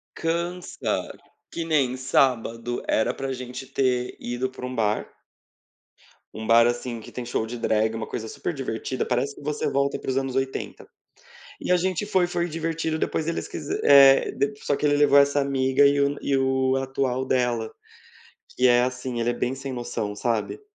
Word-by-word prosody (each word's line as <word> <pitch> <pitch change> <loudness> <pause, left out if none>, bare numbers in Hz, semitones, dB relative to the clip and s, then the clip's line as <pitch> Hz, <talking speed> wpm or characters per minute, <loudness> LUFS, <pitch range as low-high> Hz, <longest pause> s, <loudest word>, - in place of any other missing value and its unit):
Cansa, 170 +2 -3 0.3
que 170 - -4
nem 145 -6 +1
sábado, 120 -2 0
era 110 - +1
para 135 0 -4
gente 125 +1 -7
ter 130 -2 0
ido 120 +2 -3
para 130 -1 -8
um 125 0 -5
bar 105 -2 0 1.3
um 110 0 -6
bar, 115 0 +6
assim, 120 -1 -2
que - - -12
tem 125 - -6
show 110 - -1
de 120 +2 -6
drag, 110 0 +1
uma 115 -1 -4
coisa 110 -1 -5
super 170 - -4
divertida, 130 -1 -3
parece 130 +3 -1
que - - -13
você 150 0 -2
volta 140 0 0
aí - - -14
para - - -5
os 130 - -1
anos 135 -1 -2
80. 135 0 -3 0.7
E - - -2
a 180 - +5
gente 185 +2 -1
foi 190 -3 +2
foi 175 0 -1
divertido, 160 -1 -2
depois 160 0 -2
eles 170 - -2
quise 150 - -4
eh, 140 -1 +7
dep 140 0 -2
só 145 - +2
que 150 - -1
ele 145 0 +3
levou 145 -1 +5
essa 140 0 +3
amiga 135 0 +2
e 140 0 +4
o 140 0 +2
e 140 - +1
o 130 0 +1
atual 130 -1 -1
dela, 120 -4 0 0.9
que 125 - +4
é 120 0 +5
assim, 125 -1 -3
ele 115 - +1
é - - 0
bem 125 +1 -2
sem 135 0 -6
noção, 120 -4 -4
sabe. 115 - -2
130 Hz, 190 wpm, -25 LUFS, 120-140 Hz, 1.3 s, eh